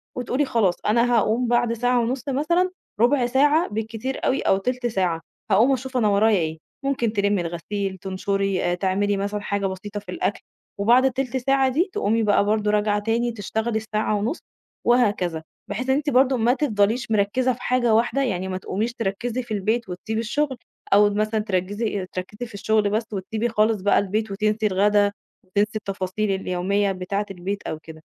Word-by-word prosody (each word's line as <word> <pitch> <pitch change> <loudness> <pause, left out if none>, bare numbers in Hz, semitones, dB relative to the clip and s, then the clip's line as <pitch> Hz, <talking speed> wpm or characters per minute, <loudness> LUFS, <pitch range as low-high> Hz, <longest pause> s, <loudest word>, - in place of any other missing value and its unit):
وتقولي 255 +3 0
خلاص 225 -9 +2
أنا 235 +3 +3
هاقوم 230 +2 +2
بعد 240 -1 +2
ساعة 245 +1 +1
ونُص 250 +4 -2
مثلًا، 340 +7 +1 0.3
ربع 245 +2 +4
ساعة 290 +7 +3
بالكتير 225 +4 -4
أوي 265 - +1
أو 190 - +3
تلت 245 +4 -2
ساعة، 180 -7 0 0.3
هاقوم 230 +8 +5
أشوف 260 0 -3
أنا 220 - +3
ورايا 210 +1 +4
إيه، 160 -1 -2 0.3
ممكن 240 -5 0
تلمي 200 -2 +1
الغسيل، 190 +3 -4
تنشري، 195 -1 -1
تعملي 195 +2 0
مثلًا 205 +1 -2
حاجة 200 -1 -2
بسيطة 200 +2 -6
في 205 - -17
الأكل 355 - -2 0.4
وبعد 240 +6 +5
التلت 260 0 0
ساعة 270 +1 +2
دي، 330 +9 +1
تقومي 225 - +1
بقى 205 -1 +3
برضه 210 0 +1
راجعة 210 0 +2
تاني 230 +3 0
تشتغلي 220 +1 -2
الساعة 215 0 -1
ونُص، 220 +10 -1 0.5
وهكذا، 205 -9 +2 0.3
بحيث 250 +6 -3
إن 265 - +4
أنتِ 295 +1 0
برضه 260 0 +4
ما 235 +2 +3
تفضليش 230 -4 0
مركزة 220 +5 +2
في 245 - -13
حاجة 245 -2 +2
واحدة، 240 +5 +2
يعني 190 -6 -2
ما 185 - -3
تقوميش 210 +5 -3
تركزي 235 +3 -2
في 235 -2 -6
البيت 215 +2 -1
وتسيبي 215 +5 -4
الشغل 260 +4 -1 0.4
أو 205 +1 +6
مثلًا 215 +2 0
تركِّزي 205 0 -2
تركِّزي 210 +6 -5
في 230 - -16
الشغل 210 +1 +1
بس 215 +3 0
وتسيبي 220 +4 -2
خالص 215 -1 +2
بقى 205 +1 +4
البيت 210 +2 -2
وتنسي 215 +2 +1
الغدا، 205 +1 +3 0.3
وتنسي 205 +4 0
التفاصيل 195 0 -2
اليومية 195 +1 0
بتاعة 195 +2 -2
البيت 195 +2 -4
أو 155 - -4
كده، 160 0 -12
215 Hz, 175 wpm, -23 LUFS, 200-245 Hz, 0.5 s, أو